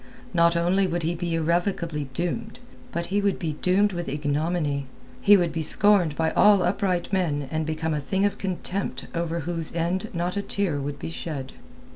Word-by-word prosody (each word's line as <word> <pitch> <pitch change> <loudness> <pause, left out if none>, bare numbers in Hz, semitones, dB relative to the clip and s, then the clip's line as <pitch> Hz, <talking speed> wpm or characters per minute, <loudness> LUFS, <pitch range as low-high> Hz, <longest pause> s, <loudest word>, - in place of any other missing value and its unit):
Not 170 -1 +4
only 185 +3 +2
would 175 -1 -2
he 165 +2 0
be 170 0 -2
irrevocably 170 -3 0
doomed, 180 - -3 0.3
but 170 -4 -2
he 205 - +3
would 200 -1 +1
be 160 -3 -2
doomed 190 +6 +2
with 175 -1 -3
ignominy, 145 0 -1 0.3
he 205 0 +7
would 175 -3 +1
be 165 +1 -2
scorned 180 -1 +3
by 160 +1 +1
all 205 -3 +5
upright 185 0 0
men 150 -7 0
and 155 0 -1
become 160 0 -1
a 150 - -1
thing 190 +8 0
of 205 - -1
contempt 185 -6 -3
over 170 0 -2
whose 165 0 -3
end 180 +5 -1
not 175 +2 -2
a 200 - 0
tear 195 -7 -1
would 140 +1 -4
be - - -6
shed. 145 -6 -5
170 Hz, 185 wpm, -25 LUFS, 155-185 Hz, 0.3 s, he